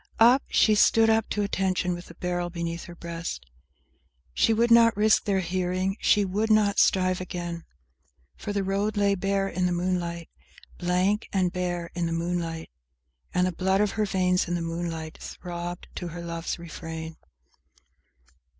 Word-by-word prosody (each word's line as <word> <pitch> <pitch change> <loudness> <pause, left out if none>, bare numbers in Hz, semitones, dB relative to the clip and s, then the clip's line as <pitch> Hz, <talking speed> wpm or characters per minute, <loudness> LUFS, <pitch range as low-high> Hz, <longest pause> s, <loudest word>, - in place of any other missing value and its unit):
Up, 245 +4 +7
she 215 - +4
stood 225 +1 +5
up 220 0 +1
to 210 - 0
attention, 190 -2 0
with 175 0 -8
the 170 - -13
barrel 175 0 -2
beneath 170 -1 -4
her 175 - -10
breast, 170 - -6 0.9
She 145 - +3
would 230 +2 +2
not 230 -2 +6
risk 215 +1 +4
their 195 -3 +1
hearing; 185 +1 -1
she 205 -1 +3
would 205 +4 -1
not 215 -2 +4
strive 185 -1 +3
again; 175 -2 -5 0.7
For 210 - -5
the 200 -1 -1
road 200 +2 -1
lay 200 -1 +3
bare 195 +1 0
in 180 -1 0
the - - -1
moonlight; 175 -1 -2 0.5
Blank 185 +4 +1
and 185 -2 +1
bare 175 -2 -3
in 175 -1 -1
the 165 - -2
moonlight; 165 -1 -3 0.6
And 180 0 +2
the 185 - 0
blood 190 +2 +1
of 210 -1 +2
her 215 - 0
veins 180 -2 +1
in 175 - -1
the 170 - -2
moonlight 165 -1 -4
throbbed 175 0 -6
to 180 - -4
her 170 +1 -7
love's 170 -1 -4
refrain 160 -1 -7
180 Hz, 165 wpm, -26 LUFS, 170-200 Hz, 0.9 s, Up